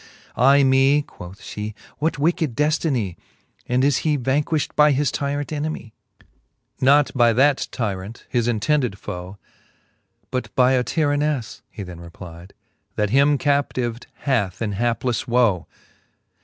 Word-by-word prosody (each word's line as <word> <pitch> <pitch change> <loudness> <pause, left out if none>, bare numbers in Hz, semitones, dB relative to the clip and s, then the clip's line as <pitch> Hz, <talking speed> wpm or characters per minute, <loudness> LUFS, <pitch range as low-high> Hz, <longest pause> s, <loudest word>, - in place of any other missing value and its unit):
Ay 140 +2 +5
me, 135 +2 +4
quoth 90 -6 -11
Ihe, 105 0 -5 0.2
what 160 +2 0
wicked 155 -3 0
deftinie? 145 - 0 0.5
And 125 +1 +1
is 140 -2 +3
he 150 -2 +1
vanquilht 145 +4 -1
by 150 -1 +5
his 140 0 +1
tyrant 145 0 -2
enemie? 150 -6 -4 0.9
XI. - - -1
Not 145 +1 +5
by 120 -3 +4
that 135 +3 +3
tyrant, 105 -1 -4
his 120 -2 0
intended 120 -1 0
foe; 90 +1 -7 0.9
But 130 0 -2
by 125 0 +4
a 130 -1 +2
tyranneile, 145 -4 -1
he 100 - -8
then 90 -2 -9
replide, 85 +1 -11 0.4
That 105 -1 0
him 140 +3 +4
captived 130 -5 -1 0.2
hath 110 -10 0
in 110 -3 -2
haplefle 120 +3 -1
woe. 115 -8 +2
130 Hz, 135 wpm, -22 LUFS, 110-145 Hz, 0.9 s, Ay